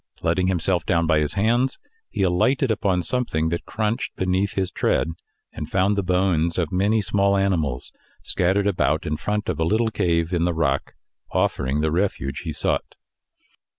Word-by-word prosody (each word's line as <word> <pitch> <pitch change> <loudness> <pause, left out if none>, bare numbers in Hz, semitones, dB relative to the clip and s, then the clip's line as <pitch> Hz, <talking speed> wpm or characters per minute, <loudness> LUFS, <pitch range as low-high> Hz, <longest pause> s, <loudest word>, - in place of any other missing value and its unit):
Letting 95 0 +1
himself 90 -1 0
down 85 -2 +1
by 80 -1 +3
his 75 +2 -1
hands, 120 +6 +1 0.3
he - - -1
alighted 120 +9 +2
upon 95 -4 0
something 80 -11 -1
that 85 +1 -3
crunched 110 +1 -2
beneath 95 +2 0
his 95 -2 -1
tread, 65 +5 +1 0.4
and 75 - -6
found 95 +2 +2
the 100 - +1
bones 90 -3 +1
of 85 -4 -1
many 100 +4 +2
small 100 0 +2
animals 80 -10 -1 0.3
scattered 95 +3 +1
about 80 -6 +1
in 75 - -1
front 105 +6 -2
of 85 -4 -2
a - - +2
little 110 +6 +1
cave 85 -4 0
in 85 -1 +1
the 85 -1 0
rock, 70 -4 -1 0.3
offering 65 +4 0
the 80 0 +1
refuge 85 -6 -1
he - - -5
sought. - - -2
90 Hz, 170 wpm, -23 LUFS, 80-100 Hz, 0.4 s, by